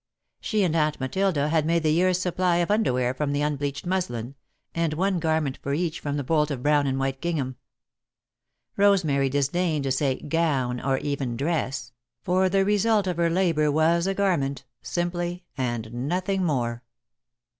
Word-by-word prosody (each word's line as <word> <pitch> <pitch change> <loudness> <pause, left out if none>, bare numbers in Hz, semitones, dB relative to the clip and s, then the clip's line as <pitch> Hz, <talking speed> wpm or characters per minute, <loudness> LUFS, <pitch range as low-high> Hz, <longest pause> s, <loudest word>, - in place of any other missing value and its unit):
She 215 -3 0
and 170 -3 +1
Aunt 155 -2 +1
Matilda 150 +2 0
had 160 -1 +2
made 165 +1 +1
the 155 - +3
year's 180 +3 +2
supply 180 -1 +1
of 175 +2 +1
underwear 125 - +1
from 145 +1 -2
the 145 +1 0
unbleached 145 -1 -2
muslin, 135 -10 -2 0.4
and 165 -2 0
one 190 +2 +1
garment 155 -4 0
for 140 +1 -1
each 170 0 -2
from 145 0 -3
the 145 - -2
bolt 150 +2 +1
of 130 -4 -4
brown 145 -1 +3
and 135 0 0
white 135 0 -2
gingham. 145 -7 -2 1.2
Rosemary 170 -10 +3
disdained 150 +3 0
to 135 - -1
say 135 0 +1
"gown" 140 -6 0
or 135 -1 +1
even 135 -5 -3
"dress," 135 -5 -2 0.3
for 185 +1 +2
the 195 0 +2
result 210 0 +2
of 180 -3 -2
her 170 -1 +2
labour 165 -4 +2
was 165 +4 +2
a 195 - 0
garment, 150 -10 0 0.2
simply, 175 0 -3
and 120 -3 -3
nothing 180 +10 -1
more. 120 -7 -1
155 Hz, 165 wpm, -25 LUFS, 135-180 Hz, 1.2 s, the